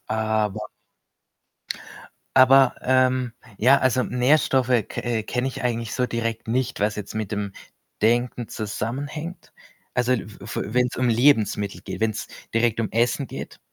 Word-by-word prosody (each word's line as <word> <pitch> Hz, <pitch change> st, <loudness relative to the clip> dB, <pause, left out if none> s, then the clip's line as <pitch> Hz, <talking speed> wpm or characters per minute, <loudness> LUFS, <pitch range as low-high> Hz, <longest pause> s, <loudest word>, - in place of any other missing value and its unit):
aber 110 Hz, -1 st, 0 dB, 1.8 s
aber, 130 Hz, 0 st, +7 dB
ähm, 130 Hz, -1 st, +2 dB, 0.3 s
ja, 130 Hz, +5 st, +6 dB
also 130 Hz, 0 st, +2 dB
Nährstoffe 130 Hz, 0 st, +2 dB, 0.2 s
ke -, -, -5 dB
äh, 120 Hz, -2 st, -1 dB
kenne 125 Hz, +4 st, -1 dB
ich 130 Hz, -, -6 dB
eigentlich 115 Hz, -2 st, -1 dB
so 125 Hz, -1 st, +1 dB
direkt 115 Hz, -1 st, -3 dB
nicht, 125 Hz, -3 st, -1 dB
was 105 Hz, 0 st, +1 dB
jetzt 105 Hz, -2 st, -6 dB
mit 110 Hz, -2 st, -3 dB
dem 100 Hz, -2 st, -3 dB, 0.5 s
Denken 120 Hz, +1 st, +1 dB
zusammenhängt. 140 Hz, -, -5 dB, 0.4 s
Also, 125 Hz, +1 st, +2 dB
l 120 Hz, -, 0 dB
f 105 Hz, 0 st, -9 dB
f -, -, 0 dB
wenn's 125 Hz, +3 st, 0 dB
um 125 Hz, -1 st, +1 dB
Lebensmittel 110 Hz, -5 st, +2 dB
geht, 95 Hz, -2 st, -7 dB
wenn's 110 Hz, -1 st, -1 dB, 0.3 s
direkt 115 Hz, -1 st, +2 dB
um 110 Hz, -, -2 dB
Essen 120 Hz, +4 st, +1 dB
geht. -, -, -8 dB
120 Hz, 145 wpm, -24 LUFS, 110-130 Hz, 1.8 s, aber